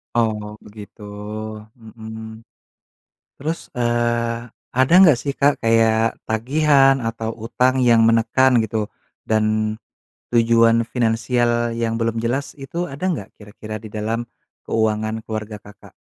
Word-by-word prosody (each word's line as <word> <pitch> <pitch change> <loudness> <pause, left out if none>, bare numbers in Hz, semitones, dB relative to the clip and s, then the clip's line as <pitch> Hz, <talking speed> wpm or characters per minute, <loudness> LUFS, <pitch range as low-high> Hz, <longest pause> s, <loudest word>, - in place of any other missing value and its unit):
Oh 105 -2 -1
begitu, 105 0 -13 0.8
mhm, 110 0 -10 1.0
terus, 160 +4 -3 0.2
eee, 120 -1 -1 0.3
ada 130 +5 +4
nggak 165 -7 +7
sih 140 - -1
Kak 145 +1 +4
kayak 115 0 +2
tagihan 135 +4 +3
atau 115 0 -3
utang 125 +2 +1
yang 115 -1 +5
menekan 115 +3 +3
gitu, 110 -1 -3 0.4
dan, 110 -1 +2 0.9
tujuan 115 -1 +4 0.2
finansial 120 0 +1
yang 115 -1 -1
belum 115 0 0
jelas 130 +4 -1
itu 145 +6 -5
ada 140 - -10
nggak 105 - -5
kira-kira 110 +1 -9
di - - -7
dalam, 110 +2 -2 0.4
keuangan 110 0 -1
keluarga 110 -1 -5
Kakak? 105 0 -16
115 Hz, 115 wpm, -21 LUFS, 110-120 Hz, 1.0 s, nggak